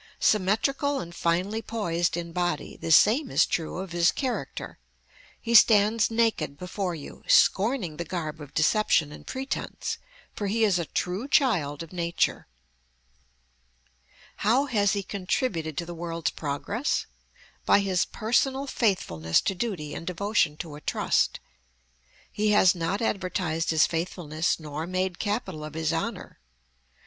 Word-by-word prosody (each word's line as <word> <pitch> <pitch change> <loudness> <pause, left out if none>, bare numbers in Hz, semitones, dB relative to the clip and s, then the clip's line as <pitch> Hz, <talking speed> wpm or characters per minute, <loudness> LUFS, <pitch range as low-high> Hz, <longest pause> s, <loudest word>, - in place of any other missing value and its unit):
Symmetrical 270 +8 +1
and 170 -7 -7
finely 180 +6 0
poised 175 -8 -1
in 170 -1 -5
body, 175 0 -2
the 165 - -4
same 240 - +5
is - - +4
true 165 0 -3
of 190 -1 -5
his 170 0 +3
character. 260 -3 -4 0.6
He 235 - -3
stands 215 -1 +6
naked 225 -11 0
before 180 +1 -3
you, 145 - -10
scorning 195 - +3
the 170 - -2
garb 160 -3 -5
of 145 -2 -10
deception 160 -2 +3
and - - -12
pretence, 265 +1 -4 0.3
for 205 - -3
he 225 +3 +1
is 195 -5 +3
a 170 - -2
true 185 - -3
child 165 - +2
of 165 - -13
nature. 170 -1 -1 1.9
How 240 +7 +2
has 205 -7 +2
he 200 -1 -1
contributed 180 - -2
to 170 - -2
the 175 - -7
world's 165 -1 -3
progress? 165 - -2 0.6
By 200 - +4
his 190 -2 +1
personal 265 +5 0
faithfulness 85 - +1
to - - -1
duty 180 -7 -4
and 165 - -7
devotion 180 -4 0
to 155 - -10
a 150 - -10
trust. - - +1 0.9
He 210 0 0
has 190 -3 +6
not 180 +5 -2
advertised 180 -5 -1
his 160 -1 +5
faithfulness 165 -1 -2
nor 155 +1 -5
made 185 0 -2
capital 205 -7 -3
of 150 0 -8
his 160 0 0
honor. 210 - -4
180 Hz, 140 wpm, -26 LUFS, 165-215 Hz, 1.9 s, stands